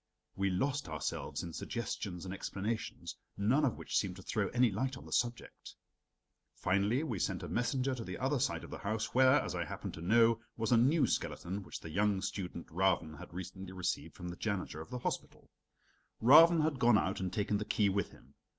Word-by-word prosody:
We 95 Hz, 0 st, +1 dB
lost 135 Hz, -, -1 dB
ourselves 80 Hz, -1 st, -3 dB
in 85 Hz, -2 st, -6 dB
suggestions 100 Hz, -5 st, -4 dB
and 95 Hz, -, -4 dB
explanations, 105 Hz, +3 st, -4 dB, 0.2 s
none 120 Hz, +9 st, +3 dB
of 130 Hz, -, +1 dB
which -, -, -5 dB
seemed 95 Hz, -3 st, +1 dB
to 95 Hz, -, -11 dB
throw 105 Hz, -1 st, 0 dB
any 120 Hz, 0 st, +3 dB
light 130 Hz, +6 st, -2 dB
on -, -, -12 dB
the -, -, -7 dB
subject. 120 Hz, -1 st, -2 dB, 0.8 s
Finally 100 Hz, +9 st, +1 dB
we 115 Hz, -, -3 dB
sent -, -, -1 dB
a -, -, -4 dB
messenger 130 Hz, +2 st, 0 dB
to 120 Hz, -3 st, -5 dB
the 90 Hz, -3 st, -6 dB
other 135 Hz, +2 st, 0 dB
side 140 Hz, -, 0 dB
of -, -, -10 dB
the -, -, -6 dB
house 110 Hz, +2 st, -2 dB
where, 130 Hz, +1 st, +6 dB
as -, -, -3 dB
I -, -, -1 dB
happened -, -, -6 dB
to 80 Hz, -, -8 dB
know, 115 Hz, +5 st, +4 dB, 0.2 s
was 115 Hz, 0 st, -1 dB
a -, -, +7 dB
new 140 Hz, +7 st, +4 dB
skeleton 95 Hz, +4 st, -2 dB
which 95 Hz, -, -8 dB
the 80 Hz, -, -8 dB
young 100 Hz, +2 st, +2 dB
student 90 Hz, -3 st, -4 dB
Ravn 85 Hz, -3 st, +1 dB
had -, -, -10 dB
recently 95 Hz, +1 st, -7 dB
received 90 Hz, -1 st, -3 dB
from 90 Hz, -, -6 dB
the 85 Hz, -, -7 dB
janitor 100 Hz, -7 st, -3 dB
of 80 Hz, -, -10 dB
the 125 Hz, -, -4 dB
hospital. 120 Hz, -, -5 dB, 0.7 s
Ravn 160 Hz, +7 st, +8 dB
had 155 Hz, -4 st, 0 dB
gone 120 Hz, -2 st, +6 dB
out 95 Hz, -2 st, 0 dB
and 95 Hz, -1 st, -2 dB
taken 105 Hz, +1 st, 0 dB
the -, -, -1 dB
key 105 Hz, -1 st, +2 dB
with 100 Hz, +1 st, 0 dB
him. -, -, -19 dB
105 Hz, 205 wpm, -33 LUFS, 95-125 Hz, 0.8 s, Ravn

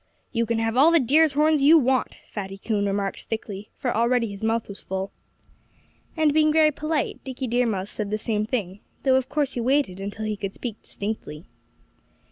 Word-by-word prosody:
"You 230 Hz, -1 st, 0 dB
can 230 Hz, 0 st, 0 dB
have 225 Hz, 0 st, 0 dB
all 280 Hz, +6 st, +6 dB
the 335 Hz, 0 st, +5 dB
deer's 295 Hz, +4 st, +4 dB
horns 305 Hz, +1 st, +3 dB
you 305 Hz, +4 st, +7 dB
want," 260 Hz, -3 st, +1 dB
Fatty 195 Hz, -2 st, -6 dB
Coon 205 Hz, 0 st, -1 dB
remarked 195 Hz, 0 st, -2 dB
thickly 210 Hz, -2 st, -5 dB
for -, -, -1 dB
already 235 Hz, +1 st, +2 dB
his 200 Hz, +1 st, -8 dB
mouth 225 Hz, 0 st, 0 dB
was 200 Hz, -, -9 dB
full. 190 Hz, +1 st, -4 dB, 1.1 s
And 310 Hz, -2 st, +3 dB
being 310 Hz, 0 st, +4 dB
very 310 Hz, 0 st, +5 dB
polite, 305 Hz, +1 st, -2 dB
Dickie 260 Hz, 0 st, -5 dB
Deer 245 Hz, 0 st, +1 dB
Mouse 195 Hz, -2 st, -2 dB
said 210 Hz, -2 st, -4 dB
the 215 Hz, -, 0 dB
same 215 Hz, -1 st, -1 dB
thing; 210 Hz, -4 st, -3 dB, 0.2 s
though 265 Hz, -1 st, +4 dB
of 260 Hz, 0 st, +1 dB
course 285 Hz, -2 st, 0 dB
he -, -, -3 dB
waited 250 Hz, -6 st, +1 dB
until 205 Hz, +2 st, -5 dB
he 215 Hz, 0 st, -1 dB
could 195 Hz, -1 st, -5 dB
speak 230 Hz, -4 st, -6 dB
distinctly. 200 Hz, -6 st, -6 dB
230 Hz, 195 wpm, -24 LUFS, 205-275 Hz, 1.1 s, you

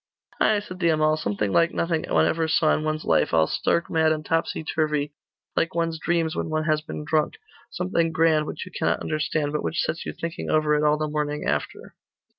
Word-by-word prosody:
'Ay,' 210 Hz, -1 st, +3 dB
said 185 Hz, -3 st, -9 dB
the 170 Hz, -2 st, +2 dB
Amal, 155 Hz, -1 st, +3 dB
'something 105 Hz, -8 st, -2 dB
like 170 Hz, -, +3 dB
nothing 165 Hz, -2 st, 0 dB
one -, -, +3 dB
ever 165 Hz, -1 st, +1 dB
saw 160 Hz, 0 st, +3 dB
in 155 Hz, -, -1 dB
one's 155 Hz, 0 st, -2 dB
life, -, -, +2 dB
all 80 Hz, -1 st, +5 dB
stark 170 Hz, -, 0 dB
mad 160 Hz, -1 st, +2 dB
and 155 Hz, -1 st, -2 dB
topsy 165 Hz, -1 st, -1 dB
turvy, 150 Hz, -2 st, -1 dB, 0.4 s
like 165 Hz, -, 0 dB
one's 165 Hz, -1 st, -1 dB
dreams 165 Hz, -1 st, 0 dB
when -, -, -2 dB
one 155 Hz, 0 st, 0 dB
has 155 Hz, -1 st, +1 dB
been 150 Hz, -1 st, -7 dB
drunk; 155 Hz, 0 st, +1 dB, 0.3 s
something 170 Hz, -2 st, 0 dB
grand 160 Hz, -1 st, +2 dB
which -, -, -5 dB
you 185 Hz, -, -11 dB
cannot -, -, 0 dB
understand, 155 Hz, -1 st, -1 dB
but 150 Hz, -, -1 dB
which 160 Hz, -, -2 dB
sets 160 Hz, +2 st, -1 dB
you -, -, -4 dB
thinking 165 Hz, 0 st, -5 dB
over 155 Hz, -1 st, +2 dB
it 150 Hz, 0 st, +2 dB
all 150 Hz, 0 st, +3 dB
the 155 Hz, 0 st, -1 dB
morning 150 Hz, 0 st, -2 dB
after. -, -, -3 dB
155 Hz, 215 wpm, -24 LUFS, 150-165 Hz, 0.4 s, all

